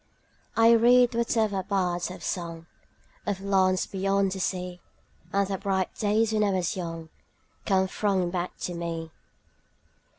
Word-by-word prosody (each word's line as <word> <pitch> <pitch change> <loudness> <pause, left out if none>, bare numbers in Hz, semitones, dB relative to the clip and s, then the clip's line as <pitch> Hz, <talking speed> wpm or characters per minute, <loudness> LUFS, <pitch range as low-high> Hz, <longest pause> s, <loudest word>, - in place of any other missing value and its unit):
I 230 0 +7
read 240 +1 +5
whatever 225 -4 +1
bards 180 -3 -1
have 180 - -9
sung 165 -3 -4 0.6
Of 200 -2 -1
lands 190 -2 +2
beyond 195 0 0
the 190 - -4
sea, 180 -1 -3 0.5
10 200 - +1
And 200 - 0
the 195 0 -2
bright 190 -2 -1
days 220 +1 +1
when 215 -1 +2
I 205 - +2
was 185 -3 0
young 165 -3 -5 0.6
Come 190 -2 +3
thronging 190 -3 0
back 180 0 -3
to 180 - -3
me. 165 -1 -4
190 Hz, 145 wpm, -27 LUFS, 180-205 Hz, 0.6 s, I